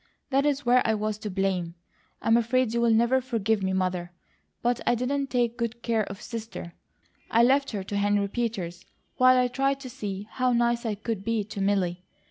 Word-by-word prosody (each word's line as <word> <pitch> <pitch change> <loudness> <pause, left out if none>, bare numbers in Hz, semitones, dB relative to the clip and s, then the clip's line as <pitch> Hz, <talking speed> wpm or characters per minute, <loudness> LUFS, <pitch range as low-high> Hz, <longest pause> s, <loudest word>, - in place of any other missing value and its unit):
That 275 +2 +3
is 290 -1 0
where 250 +1 +5
I 220 - +1
was 215 0 -2
to 215 - -5
blame. 185 -3 -1 0.5
I'm 225 - +4
afraid 235 0 +2
you'll 235 0 +2
never 235 +4 +3
forgive 225 -4 0
me, 190 0 0
Mother; 185 -2 -1 0.5
but 240 0 +1
I - - +4
didn't 275 +3 -1
take 240 -2 0
good 235 0 -3
care 225 -3 +1
of 195 0 -9
Sister. 225 -7 -7 0.6
I 230 +1 +4
left 275 +3 +3
her 200 -4 -4
to 200 +1 -4
Henry 205 0 +2
Peters, 195 -6 -3 0.3
while 255 0 +6
I 250 0 +3
tried 270 +2 0
to 255 -2 -8
see 200 -2 -5
how 255 -1 +1
nice 235 0 +1
I 215 - -1
could 215 -1 -4
be 225 0 0
to 205 0 -6
Milly. 185 -3 0
225 Hz, 195 wpm, -27 LUFS, 200-245 Hz, 0.6 s, while